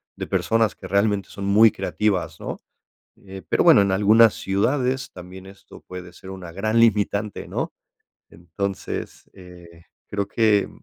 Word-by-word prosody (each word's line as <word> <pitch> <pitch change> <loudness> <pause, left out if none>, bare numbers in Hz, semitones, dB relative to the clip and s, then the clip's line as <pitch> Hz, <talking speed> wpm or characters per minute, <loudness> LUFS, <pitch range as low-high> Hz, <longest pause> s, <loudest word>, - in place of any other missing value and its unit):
de - - -6
personas 115 -1 +1
que 95 - -10
realmente 100 0 0
son 100 - -7
muy 105 +2 +6
creativas, 95 -4 -2
¿no?, - - -6 0.6
eh, 95 -1 -11
pero - - +2
bueno, 100 - +7
en 100 -1 0
algunas 110 +3 +5
ciudades 130 +7 -1
también 90 +1 -11
esto 100 0 -15
puede 90 -1 -10
ser 95 +1 -12
una 90 -3 -9
gran 110 +5 0
limitante 105 -2 +1
¿no?, - - -3 0.6
entonces, 95 +3 -6
eh, 90 -2 -15 0.2
creo 100 -1 -2
que 110 -3 +2
100 Hz, 145 wpm, -22 LUFS, 95-110 Hz, 0.6 s, bueno